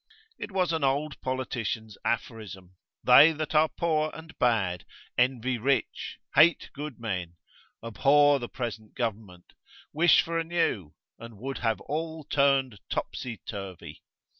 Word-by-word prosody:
It -, -, -6 dB
was 180 Hz, -3 st, +1 dB
an 160 Hz, -2 st, -1 dB
old 140 Hz, +2 st, 0 dB
politician's 120 Hz, -4 st, -3 dB
aphorism, 100 Hz, -6 st, -4 dB, 0.3 s
They 140 Hz, +6 st, +8 dB
that 155 Hz, 0 st, -4 dB
are 155 Hz, +1 st, +4 dB
poor 155 Hz, -2 st, 0 dB
and 160 Hz, 0 st, -11 dB
bad 100 Hz, -8 st, +1 dB, 0.3 s
envy 125 Hz, 0 st, +1 dB
rich, 130 Hz, 0 st, -1 dB, 0.2 s
hate 165 Hz, +1 st, +4 dB
good 145 Hz, -2 st, -7 dB
men, 90 Hz, -7 st, -4 dB, 0.5 s
abhor 140 Hz, +5 st, +4 dB
the 120 Hz, -, -6 dB
present 110 Hz, -3 st, -6 dB
government, 105 Hz, -7 st, -5 dB, 0.4 s
wish 165 Hz, +2 st, +5 dB
for 165 Hz, -1 st, -2 dB
a -, -, 0 dB
new, 140 Hz, -, -1 dB, 0.2 s
and 115 Hz, -2 st, -11 dB
would 135 Hz, +5 st, -5 dB
have 115 Hz, -2 st, 0 dB
all 160 Hz, +1 st, -4 dB
turned 135 Hz, -6 st, +2 dB
topsy 120 Hz, -3 st, -4 dB
turvy. 95 Hz, -4 st, -8 dB
130 Hz, 135 wpm, -28 LUFS, 110-155 Hz, 0.5 s, They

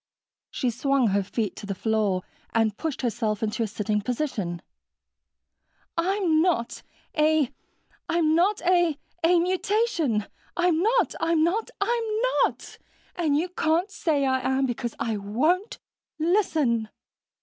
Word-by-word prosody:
She 250 Hz, -, -1 dB
swung 270 Hz, 0 st, +2 dB
her 200 Hz, +1 st, +2 dB
feet 205 Hz, +2 st, -3 dB
to 205 Hz, -, -8 dB
the 195 Hz, -, -3 dB
floor 210 Hz, -3 st, 0 dB, 0.3 s
and 220 Hz, -2 st, +2 dB
pushed 310 Hz, -1 st, -4 dB
herself 220 Hz, -3 st, -1 dB
into 215 Hz, +1 st, -1 dB
a 225 Hz, -, +1 dB
sitting 210 Hz, 0 st, -1 dB
position. 215 Hz, -, -3 dB, 1.3 s
"I'm 345 Hz, -2 st, +2 dB
not 325 Hz, -10 st, 0 dB, 0.3 s
a... 305 Hz, -3 st, +3 dB, 0.6 s
a 345 Hz, 0 st, +2 dB, 0.2 s
mutation. 350 Hz, -, +2 dB, 0.3 s
I'm 350 Hz, -2 st, +3 dB
not, 465 Hz, +5 st, +2 dB
I'm 330 Hz, -1 st, +2 dB
not, 390 Hz, +7 st, 0 dB
I'm 475 Hz, 0 st, +1 dB, 0.4 s
NOT, -, -, -7 dB, 0.4 s
and 310 Hz, -5 st, +1 dB
you 335 Hz, +4 st, 0 dB
can't 340 Hz, +2 st, 0 dB
say 295 Hz, -4 st, 0 dB
I 260 Hz, 0 st, +2 dB
am, 265 Hz, +1 st, +1 dB
because 240 Hz, -1 st, -3 dB
I 225 Hz, -2 st, -1 dB
won't 310 Hz, -, 0 dB, 0.4 s
listen!" 310 Hz, -, +1 dB
300 Hz, 120 wpm, -26 LUFS, 225-345 Hz, 1.3 s, a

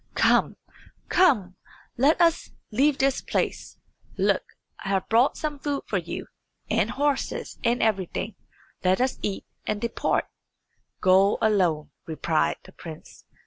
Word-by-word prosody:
"Come, -, -, +3 dB, 0.5 s
come; 215 Hz, -, +3 dB, 0.4 s
let 280 Hz, +6 st, +3 dB
us 335 Hz, -1 st, +3 dB, 0.2 s
leave 275 Hz, +6 st, +3 dB
this 270 Hz, 0 st, +1 dB
place. -, -, -2 dB, 0.4 s
Look, -, -, +2 dB, 0.4 s
I 195 Hz, -, -4 dB
have 195 Hz, -1 st, 0 dB
brought 235 Hz, +4 st, +4 dB
some 300 Hz, -2 st, -3 dB
food 285 Hz, 0 st, -2 dB
for -, -, 0 dB
you, -, -, -6 dB, 0.5 s
and -, -, +2 dB
horses, 285 Hz, -1 st, -1 dB
and 240 Hz, +1 st, +2 dB
everything. 195 Hz, -5 st, -1 dB, 0.5 s
Let 185 Hz, 0 st, +3 dB
us 255 Hz, +1 st, 0 dB
eat 200 Hz, -2 st, -3 dB, 0.2 s
and 210 Hz, -1 st, -1 dB
depart." 235 Hz, +1 st, 0 dB, 0.8 s
"Go 190 Hz, +2 st, +5 dB
alone," 180 Hz, -8 st, +1 dB, 0.2 s
replied 160 Hz, 0 st, 0 dB
the -, -, -14 dB
prince. 160 Hz, -2 st, -11 dB
220 Hz, 130 wpm, -25 LUFS, 185-275 Hz, 0.8 s, Go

